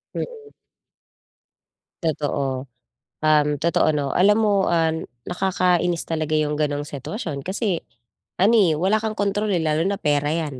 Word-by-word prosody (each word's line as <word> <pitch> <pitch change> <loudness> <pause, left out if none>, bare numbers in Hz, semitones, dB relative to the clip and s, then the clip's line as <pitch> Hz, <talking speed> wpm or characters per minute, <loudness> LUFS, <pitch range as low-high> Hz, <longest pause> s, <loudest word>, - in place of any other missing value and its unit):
Mm. 445 -3 -6 1.5
Totoo. 140 -4 -1 0.6
Um, 150 -1 +3
totoo 165 0 +2
'no, 140 -2 -1
alam 205 +3 +5
mo, 200 -2 +2
ah, 165 -2 +2 0.4
nakakainis 180 -2 +1
talaga 155 -1 -1
'yong 150 -1 +1
ganong 145 -1 0
sitwasyon 145 - -5
kasi 190 -2 -1 0.6
ano, 215 +5 +5
eh, 195 -7 +5
wala 195 +5 +2
kang 220 -1 -2
kontrol, 205 +1 0
eh, 180 - +2
lalo 155 0 +1
na 200 - 0
pera 145 0 +1
'yan, 155 -5 -3
165 Hz, 135 wpm, -22 LUFS, 150-195 Hz, 1.5 s, alam